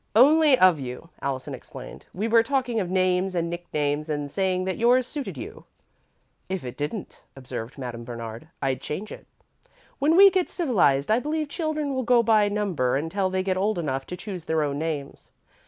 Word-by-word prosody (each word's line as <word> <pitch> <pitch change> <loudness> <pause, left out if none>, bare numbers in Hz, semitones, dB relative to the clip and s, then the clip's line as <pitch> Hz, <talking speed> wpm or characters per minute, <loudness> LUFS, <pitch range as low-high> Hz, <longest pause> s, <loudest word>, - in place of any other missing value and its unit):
"Only 290 +3 +6
of 185 -7 +5
you," 130 +5 -7
Allison 135 -2 -3
explained. - - -10
"We 205 +5 -2
were 230 0 +5
talking 250 -2 0
of 185 -4 -2
names 185 0 +1
and 170 -1 -1
nicknames 150 -3 -2
and 145 -2 -3
saying 185 0 0
that 190 -1 -3
yours 245 +2 +4
suited 285 +1 -5
you." - - -8 0.8
"If 185 -7 -3
it 125 - -6
didn't," 150 +8 -5
observed 125 -2 -7
Madame 120 -3 -6
Bernard, 115 +2 -7 0.2
"I'd 135 -1 0
change 195 +8 -5
it. - - -10 0.7
When 300 +4 +3
we 395 +2 +9
get 370 -1 0
civilised, 190 - +2
I 225 - +4
believe 305 +2 -2
children 305 -3 -2
will 260 - 0
go 245 -1 +4
by 215 -2 +4
number 190 -12 0
until 185 +7 -1
they 185 0 -1
get 185 -1 0
old 205 +2 +1
enough 135 -5 -2
to 180 - -6
choose 180 -3 -7
their 160 -1 +1
own 145 -1 -2
names. 150 -3 -4
185 Hz, 185 wpm, -25 LUFS, 145-235 Hz, 0.8 s, we